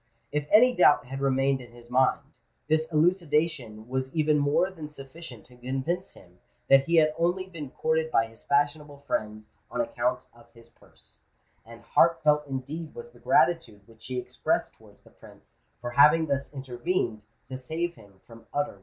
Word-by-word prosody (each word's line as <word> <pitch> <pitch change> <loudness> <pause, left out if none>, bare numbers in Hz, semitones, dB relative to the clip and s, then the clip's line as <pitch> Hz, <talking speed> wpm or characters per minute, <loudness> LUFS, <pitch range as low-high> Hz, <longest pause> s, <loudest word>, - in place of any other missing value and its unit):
If 150 0 -2
any 245 +3 +6
doubt 150 -7 +5
had 135 +2 -6
remained 135 0 +1
in 120 -1 -14
his 120 0 -16
mind, 130 +1 +3 0.5
this 155 +1 +1
elucidation 155 - 0
was 130 +1 -3
even 155 -1 +2
more 150 +6 +2
than 160 -5 -9
sufficient 135 -4 -11
to 125 -1 -19
convince 135 +9 -3
him 90 0 -19 0.3
that 135 0 +6
he 170 - +1
had 155 -2 +4
only 175 +2 +1
been 165 -7 -8
courted 160 +3 -1
by 115 - +2
his 115 0 -15
fashionable 145 0 0
friends 110 -2 -3 0.2
on - - -5
account 125 +1 -1
of 120 0 -20
his 115 0 -18
purse; - - -21 0.4
and 115 +1 -14
heart 165 -1 +3
felt 150 -1 +3
indeed 140 +5 -6
was 470 0 -10
the - - -20
gratitude 125 -12 +2
which 115 -1 -15
he 130 - -4
expressed 125 - -2
towards - - -21
the - - -20
Prince - - -18 0.2
for 120 0 -5
having 150 +5 +6
thus 140 -2 -2
intervened 130 - -3 0.2
to 130 - -8
save 160 +7 -3
him 100 - -19
from 115 -1 -15
utter 145 0 -1
ruin. 100 - -18
140 Hz, 180 wpm, -27 LUFS, 120-160 Hz, 0.5 s, any